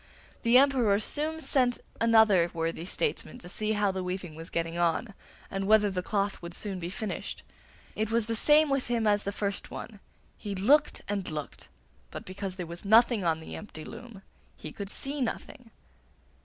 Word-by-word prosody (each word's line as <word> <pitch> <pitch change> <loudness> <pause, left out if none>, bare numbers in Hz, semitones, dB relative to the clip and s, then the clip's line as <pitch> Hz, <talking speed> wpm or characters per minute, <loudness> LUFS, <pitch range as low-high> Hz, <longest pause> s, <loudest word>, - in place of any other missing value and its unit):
The 235 +1 +5
Emperor 255 -7 +4
soon 310 +7 -2
sent 250 -5 +2 0.2
another 220 -6 +5
worthy 165 0 -2
statesman 435 - -2
to 240 - -11
see 215 +4 -1
how 205 -2 +2
the 190 -1 -3
weaving 180 -2 -4
was 165 +1 -9
getting 165 0 -2
on, 175 +6 +1 0.4
and 195 0 -2
whether 210 -1 +5
the 185 -1 -2
cloth 200 +1 -1
would 170 0 -6
soon 195 -3 -3
be 170 0 -4
finished. 210 +2 -5 0.5
It 215 0 -1
was 230 -1 +1
the 230 - -2
same 300 +4 +5
with 275 -2 0
him 235 -2 0
as 205 -1 +2
the 200 - -1
first 200 -1 -3
one; 215 -4 -8 0.4
he 205 -1 -4
looked 285 +11 +3
and 200 -2 -2
looked, 150 -3 -6 0.4
but - - -8
because 185 0 -5
there 180 -2 -5
was 170 +1 -8
nothing 225 +1 +5
on 160 -2 +1
the - - -8
empty 160 -7 -9
loom 230 -6 -10 0.3
he - - -8
could 200 -1 -6
see 275 +6 -1
nothing. 245 0 -4
205 Hz, 180 wpm, -29 LUFS, 185-235 Hz, 0.5 s, The